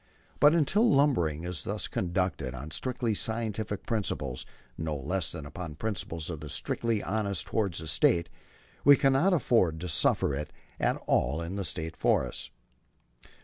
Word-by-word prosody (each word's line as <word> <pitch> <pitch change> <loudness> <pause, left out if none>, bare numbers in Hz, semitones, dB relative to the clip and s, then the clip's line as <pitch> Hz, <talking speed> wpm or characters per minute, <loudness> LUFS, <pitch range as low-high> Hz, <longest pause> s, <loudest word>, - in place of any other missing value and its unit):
But 145 +2 +6
until 200 - +3
lumbering 115 - +2
is 90 0 -4
thus 105 +1 -2
conducted, 85 -7 -1
on 75 +5 -7
strictly 125 0 -1
scientific 110 -1 -3
principles 75 - -2 0.3
no 80 -1 -3
less 75 +4 -2
than 80 -4 -7
upon 80 +1 -7
principles 85 -5 -3
of 80 - -5
the 75 0 -8
strictest 115 - -1
honesty 100 -3 -1
toward 100 -6 0
the 80 -1 -3
State, 85 +3 +3 0.6
we 145 +1 +9
cannot 135 +7 +3
afford 115 - +2
to 90 - -3
suffer 75 -2 +2
it 75 +2 -4 0.3
at - - +2
all 70 +7 +1
in 85 +3 -4
the 100 - -2
State 80 -2 -3
forests. - - 0
90 Hz, 150 wpm, -29 LUFS, 80-115 Hz, 0.6 s, we